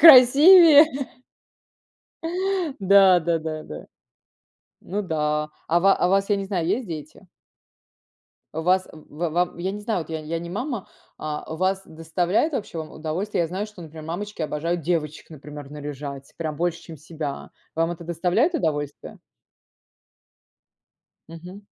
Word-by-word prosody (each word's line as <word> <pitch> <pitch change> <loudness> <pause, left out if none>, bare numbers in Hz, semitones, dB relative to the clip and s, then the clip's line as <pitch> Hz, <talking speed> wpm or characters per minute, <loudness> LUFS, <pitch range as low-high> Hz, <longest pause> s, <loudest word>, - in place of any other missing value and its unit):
красивее! 305 +3 +9 1.9
Да 195 -1 +6
да 170 0 0
да 155 -1 -5
да. 75 - -9 0.9
Ну 205 +3 -3
да. 150 -3 -1 0.2
А 170 +2 +3
ва 195 +1 +5
а 180 - +2
вас 195 +2 +2
я 205 - +4
не 195 - -3
знаю, 185 -4 -2
есть 245 +2 0
дети? 155 +3 -9 1.3
Вас 180 +4 +1
в 160 +1 -5
вам, 175 +2 0
я 180 +2 -2
не 210 - -6
знаю, 215 -3 -1
вот 165 - -8
я 160 - -2
я 160 +2 -4
не 170 +1 -7
мама, 235 +2 -4 0.3
а 155 +1 -5
вас 190 +2 0
доставляет, 170 - 0
вообще, 210 -10 -4
вам 155 -1 -6
удовольствие. 170 +6 -3
Я 165 - -2
знаю, 190 +4 -3
что, 210 -4 -14
например, 160 -1 -10
мамочки 180 +3 -5
обожают 165 +3 -2
девочек, 155 -1 -2
например, 145 -1 -10
наряжать, 145 -2 -7
прям 155 -3 -4
больше, 170 0 -1
чем 165 - -10
себя. 155 -2 -6 0.2
Вам 165 +1 0
это 170 0 -9
доставляет 180 - +1
удовольствие? 145 - -3 2.1
Мгм. 180 +5 -11
170 Hz, 140 wpm, -24 LUFS, 155-195 Hz, 2.1 s, красивее